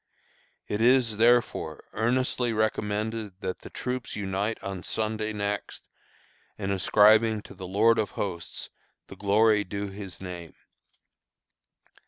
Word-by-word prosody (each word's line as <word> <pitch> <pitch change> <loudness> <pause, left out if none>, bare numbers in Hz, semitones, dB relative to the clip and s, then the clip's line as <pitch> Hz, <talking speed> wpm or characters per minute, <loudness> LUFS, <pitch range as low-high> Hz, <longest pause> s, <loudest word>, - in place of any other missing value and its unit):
"It 105 - -2
is, 120 -3 +4
therefore, 115 -9 +2
earnestly 125 +1 +1
recommended 105 -1 -1
that 95 -2 -3
the - - -11
troops 125 -1 -4
unite 100 +2 -2
on 95 -2 -4
Sunday 110 +2 -2
next 100 -1 -3 0.7
in 100 -2 -2
ascribing 110 +3 +4
to - - -12
the 95 -1 -8
Lord 110 +4 +4
of 105 - 0
Hosts 85 -5 -4 0.3
the - - -11
glory 105 +1 +3
due 100 +1 -4
His 95 -1 -8
name. 90 -3 -8
105 Hz, 120 wpm, -27 LUFS, 100-110 Hz, 0.7 s, is